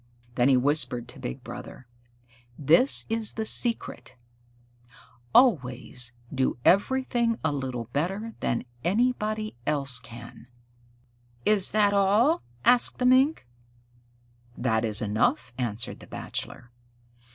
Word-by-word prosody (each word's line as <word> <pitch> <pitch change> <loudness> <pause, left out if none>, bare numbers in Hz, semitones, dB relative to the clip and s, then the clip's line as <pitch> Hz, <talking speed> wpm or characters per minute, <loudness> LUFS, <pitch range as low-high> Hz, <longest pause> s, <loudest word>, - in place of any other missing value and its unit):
Then 120 +2 +2
he 130 - +5
whispered 125 -3 +1
to - - -11
Big 60 - -6
Brother, 130 - -10 0.7
"This 165 - +4
is 225 -1 -1
the 220 - -3
secret: 235 +1 0 1.2
always 125 - +2 0.2
do 130 -3 0
everything 235 +2 +2
a 160 - +1
little 130 -4 -4
better 195 +10 -2
than 120 - -2 0.2
anybody 215 - -1
else 140 -4 0
can." 115 +1 -12 1.0
"Is 205 -3 +3
that 205 -1 +2
all?" 205 - +3 0.2
asked 245 -1 +4
the 250 - -1
young - - +6
Mink. 265 - +3 1.1
"That 110 -3 0
is 110 -2 -1
enough," 110 +4 0
answered 115 -2 -3
the - - -14
Bachelor. 125 0 -6
155 Hz, 115 wpm, -26 LUFS, -, 1.2 s, young